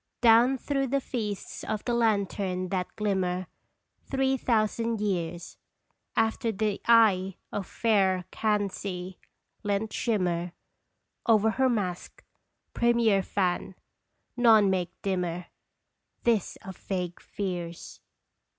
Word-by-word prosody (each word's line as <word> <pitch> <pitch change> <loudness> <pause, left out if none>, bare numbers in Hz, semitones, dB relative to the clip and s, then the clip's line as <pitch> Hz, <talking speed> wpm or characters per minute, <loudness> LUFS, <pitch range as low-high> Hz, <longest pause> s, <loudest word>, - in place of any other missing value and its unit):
Down 240 +3 +6
through 275 +1 -1
the 275 +2 +1
Feasts 215 -6 -5
of 215 - -3
the 240 - 0
Lantern 200 -5 0
that 180 -1 -1
glimmer 185 -3 0 0.6
Three 270 0 +2
thousand 230 -2 0
years, 175 -4 -3 0.6
After 225 +1 +1
the 210 -1 -1
eye 200 -5 +5 0.2
of 200 -3 -4
fair 190 -5 +2
Kansi 195 -3 -2 0.4
lent 205 +1 -1
shimmer 180 -6 0 0.7
Over 220 -1 +4
her 260 +3 +2
masque, 190 -7 -3 0.5
premier 235 -4 +3
fan, 185 -1 -1 0.6
none 220 -5 +5
make 180 -1 -2
dimmer 180 -2 -1 0.8
This 225 -5 +1
of 190 -2 -8
vague 180 -3 -4
fears 175 -4 -5
205 Hz, 105 wpm, -28 LUFS, 185-230 Hz, 0.8 s, Down